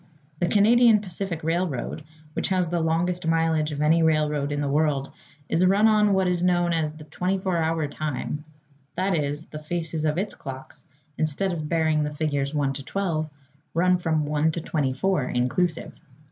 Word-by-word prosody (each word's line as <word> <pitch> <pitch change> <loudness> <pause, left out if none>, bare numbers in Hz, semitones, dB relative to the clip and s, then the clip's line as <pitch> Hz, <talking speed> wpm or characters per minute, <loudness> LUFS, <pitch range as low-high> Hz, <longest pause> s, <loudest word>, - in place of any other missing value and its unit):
The 175 - +1
Canadian 225 +3 +5
Pacific 185 -3 -5
Railroad, 165 -3 -2 0.3
which - - -1
has 185 -3 +1
the 175 0 0
longest 165 +2 0
mileage 160 -1 +1
of 150 0 -2
any 160 +2 +4
railroad 150 -2 +1
in 145 - -1
the 145 - -1
world, 140 -1 +1 0.4
is 170 - +1
run 200 +4 +5
on 210 -2 +4
what 190 -1 +2
is 180 -1 0
known 175 -1 +2
as 155 -2 -1
the 155 0 -11
24 185 +4 -1
Hour 160 -1 0
Time; 150 0 -4 0.5
that 190 0 +1
is, 145 0 -2
the 150 - -8
faces 160 0 -3
of 155 0 0
its 200 +3 -2
clocks, 135 +2 -9 0.3
instead 160 +5 0
of 155 -3 -4
bearing 160 -2 +2
the 150 0 -4
figures 145 -3 -1
1 145 -3 0
to 135 0 -7
12, 160 -3 -2 0.5
run 180 +1 +3
from 160 -3 0
1 150 +2 +1
to 170 - -3
24 150 +2 0
inclusive. 140 +8 -1
160 Hz, 175 wpm, -25 LUFS, 150-180 Hz, 0.5 s, Canadian